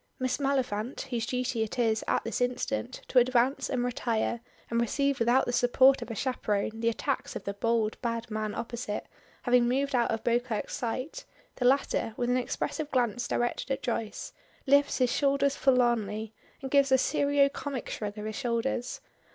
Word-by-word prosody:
Miss 255 +1 -1
Maliphant, 260 -4 -1
whose 235 -2 -1
duty 250 -2 -1
it 220 +3 -3
is 225 -3 +1
at - - +1
this 230 +1 -3
instant 250 +1 -2
to 255 - +5
advance 250 +2 +2
and 250 -2 0
retire 235 -1 -1 0.3
and 235 0 +2
receive 275 +4 0
without 240 +3 +3
the 245 - -2
support 260 +2 +5
of - - -6
a 225 - -4
chaperone 220 -4 -1
the 230 0 +2
attacks 265 +4 -2
of - - -5
the 200 - -3
bold, 220 +1 0
bad 230 -1 -3
man 215 -1 -2
opposite, 235 -2 -4 0.4
having 245 -1 +4
moved 275 +3 0
out 240 -2 +2
of 225 -1 -2
Beauclerk's 240 -2 -1
sight, 255 - -4 0.3
the 250 - -1
latter, 255 -4 +2
with 245 0 0
an 250 - +3
expressive 290 +4 -2
glance 245 -2 0
directed 240 +2 -1
at 270 - -2
Joyce, 225 -3 -3 0.3
lifts 280 +1 +4
his 250 -2 +2
shoulders 280 0 +2
forlornly, 225 -5 +1 0.3
and 265 - -5
gives 280 -1 +4
a 265 - +7
serio 285 +2 +3
comic 280 -2 -5
shrug 205 -1 -5
of 210 - -5
his 215 -1 -4
shoulders. 245 0 -2
245 Hz, 175 wpm, -29 LUFS, 230-265 Hz, 0.4 s, a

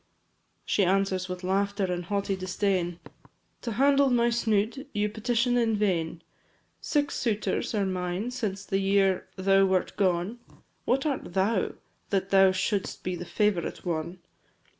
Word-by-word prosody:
V. - - -43 0.6
She 200 - +2
answers 190 0 +1
with 180 0 -5
laughter 200 +2 0
and 180 -1 -3
haughty 200 +1 -1
disdain 185 -2 -1 0.6
"To 235 - -3
handle 275 +3 +4
my 240 -1 +3
snood 230 +3 0
you 210 -1 0
petition 240 +3 +1
in 225 -2 +2
vain; 170 -5 -1 0.6
Six 290 -1 0
suitors 220 -1 -1
are 200 -2 +1
mine 185 +4 -2
since 200 -5 -3
the 195 - 0
year 195 -1 +2
thou 195 0 +4
wert 185 -1 0
gone, 185 +4 0 0.5
What 270 +3 +1
art 270 - -3
thou, 195 +1 +1 0.4
that 195 -1 -1
thou 195 -1 +6
should'st 190 +1 -2
be 180 0 -2
the 175 - -6
favourite 185 0 -1
one? 170 +1 -3
195 Hz, 145 wpm, -27 LUFS, 185-220 Hz, 0.6 s, thou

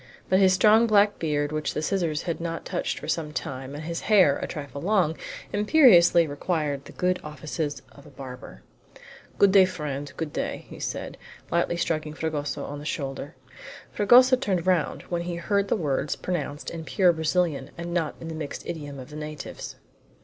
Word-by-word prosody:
But 185 - +4
his 190 -1 +6
strong 215 +5 +5
black 205 -1 +4
beard, 145 -2 0
which 155 0 -2
the 150 - -2
scissors 170 -4 0
had 170 -2 -3
not 165 -1 -4
touched - - -2
for - - -7
some 155 -2 -1
time, 135 -1 -5
and 150 - -6
his 170 +1 -4
hair, 185 -10 +4
a - - -3
trifle 145 -2 -7
long, 180 -4 +2 0.4
imperiously 205 - +6
required 145 -1 -2
the - - -11
good 180 0 0
offices 150 0 -4
of 140 - -16
a - - -12
barber. 125 - -10 0.7
"Good 200 - +5
day, 190 -1 +7
friend, 145 -5 -5
good 160 -3 -4
day!" - - -3
said - - -5 0.3
he, - - -25
lightly 170 0 +1
striking 155 -3 -2
Fragoso 150 -3 -3
on 145 0 -6
the - - -9
shoulder. 140 -2 -4 0.6
Fragoso 250 +5 +6
turned 190 -9 -1
round 180 -4 +1
when 175 -1 -3
he 175 0 -4
heard 200 +3 0
the - - +1
words 145 -2 -1
pronounced 145 -5 -4
in 165 -1 -6
pure 180 +1 +3
Brazilian, 160 -3 0
and 170 0 -5
not 165 -4 -1
in 165 - -8
the 165 - -5
mixed 155 -2 -6
idiom 145 -4 -6
of 130 +2 -10
the - - -9
natives. 150 -1 -7
160 Hz, 185 wpm, -26 LUFS, 145-185 Hz, 0.7 s, day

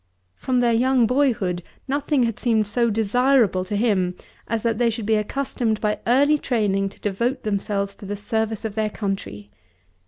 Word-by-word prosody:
From 250 - 0
their 240 -1 +3
young 250 +1 +3
boyhood 225 -9 +1 0.3
nothing 285 0 +1
had 230 -3 -1
seemed 225 -3 +2
so 235 +3 +1
desirable 225 -2 +2
to 205 - -3
him 200 -5 +1 0.3
as 230 -2 -2
that 230 -1 0
they 240 -1 +3
should 225 -1 -4
be 220 - +2
accustomed 220 0 -1
by 210 -1 -1
early 285 +5 +4
training 200 -6 0
to - - -19
devote 235 +6 -1
themselves 200 -1 -2
to 200 - -10
the 205 +1 -4
service 220 +1 -2
of 220 - -3
their 215 0 0
country. 195 - -5
220 Hz, 175 wpm, -23 LUFS, 200-245 Hz, 0.3 s, early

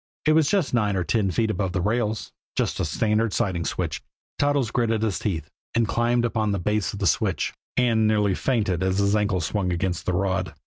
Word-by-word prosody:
It 155 - +4
was 155 -2 +4
just 190 -11 +1
nine 105 -4 +2
or 90 - 0
ten 95 +4 +1
feet 110 +5 +1
above 95 -2 -2
the 95 - 0
rails 105 +2 -1 0.2
just - - -1
a - - +1
standard 110 0 +1
siding 85 -4 0
switch. - - -2 0.4
Toddles 145 -5 +1
gritted 115 -3 +1
his 105 -4 0
teeth, 85 -6 -2 0.3
and 115 -1 +2
climbed 120 +3 +1
upon 110 -3 0
the - - 0
base 105 +3 0
of - - -5
the 100 - -2
switch - - +1 0.2
and 115 -3 +3
nearly 105 -2 +2
fainted 105 -7 0
as 95 0 +1
his 100 +1 +2
ankle 105 -3 +1
swung 90 +2 -1
against 90 0 -2
the 90 - +1
rod. 95 -3 -1
105 Hz, 210 wpm, -24 LUFS, 95-115 Hz, 0.4 s, It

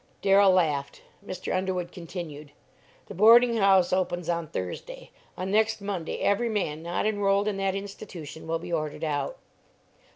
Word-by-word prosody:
Darrell 195 0 +6
laughed. 150 -7 +1 0.2
Mr. 185 -2 -4
Underwood 185 -2 -2
continued: 155 -4 -8 0.5
"The - - -9
boarding 230 +4 +6
house 195 -3 +4
opens 175 -2 -1
on 170 -1 -1
Thursday; - - -6 0.3
on 185 +1 -3
next 220 +1 +2
Monday 195 -5 -4
every 230 +4 +2
man 160 -8 -2
not 170 +4 -2
enrolled 205 -1 +1
in 205 -2 -1
that 195 -1 0
institution 190 -6 -8
will 165 0 0
be 170 +1 -7
ordered 155 -2 -3
out." 155 - -2
185 Hz, 150 wpm, -27 LUFS, 165-205 Hz, 0.5 s, Darrell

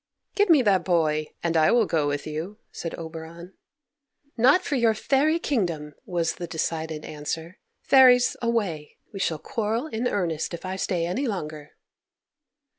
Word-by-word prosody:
"Give 410 -1 +2
me 305 -6 +6
that 195 -5 +3
boy, 155 -4 +1 0.2
and 170 -1 0
I 155 -1 +5
will 235 -2 +4
go 155 -5 0
with 145 0 -2
you," 160 +7 -5
said 165 - -5
Oberon. 165 +2 -9 0.8
"Not 265 +10 +4
for - - -3
your 235 -4 +3
fairy 285 +8 +2
kingdom!" 170 - -2
was 170 -4 -1
the 175 - -5
decided 160 -1 -3
answer. 160 +4 -6 0.2
"Fairies, 250 -2 +6
away! 205 -11 -2 0.2
We 195 - -6
shall 165 -4 0
quarrel 225 - -2
in 245 -5 -2
earnest 170 -6 -2
if 170 - -10
I 185 0 -3
stay 180 -3 -1
any 205 +11 -1
longer." 155 -7 -5
175 Hz, 155 wpm, -25 LUFS, 160-230 Hz, 0.8 s, me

